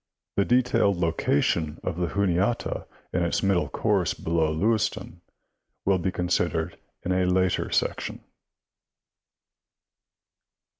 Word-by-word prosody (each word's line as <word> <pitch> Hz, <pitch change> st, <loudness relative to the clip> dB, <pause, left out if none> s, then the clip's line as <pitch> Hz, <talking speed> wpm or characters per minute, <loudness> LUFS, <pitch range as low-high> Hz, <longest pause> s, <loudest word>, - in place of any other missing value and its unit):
The 100 Hz, -, +2 dB
detailed 115 Hz, -5 st, +3 dB
location 80 Hz, -2 st, +1 dB
of -, -, -2 dB
the 90 Hz, -1 st, 0 dB
Juniata 100 Hz, +4 st, 0 dB, 0.3 s
in 90 Hz, -, +1 dB
its 85 Hz, -, 0 dB
middle 90 Hz, -6 st, +2 dB
course -, -, +1 dB
below 80 Hz, -1 st, 0 dB
Lewistown 105 Hz, +6 st, 0 dB, 0.6 s
will 95 Hz, -1 st, +3 dB
be 95 Hz, +2 st, -1 dB
con 90 Hz, -1 st, -2 dB
sidered 85 Hz, -2 st, 0 dB, 0.3 s
in 90 Hz, -, -2 dB
a 90 Hz, 0 st, +2 dB
later 90 Hz, 0 st, +1 dB
section. -, -, -1 dB
90 Hz, 110 wpm, -26 LUFS, 85-100 Hz, 0.6 s, detailed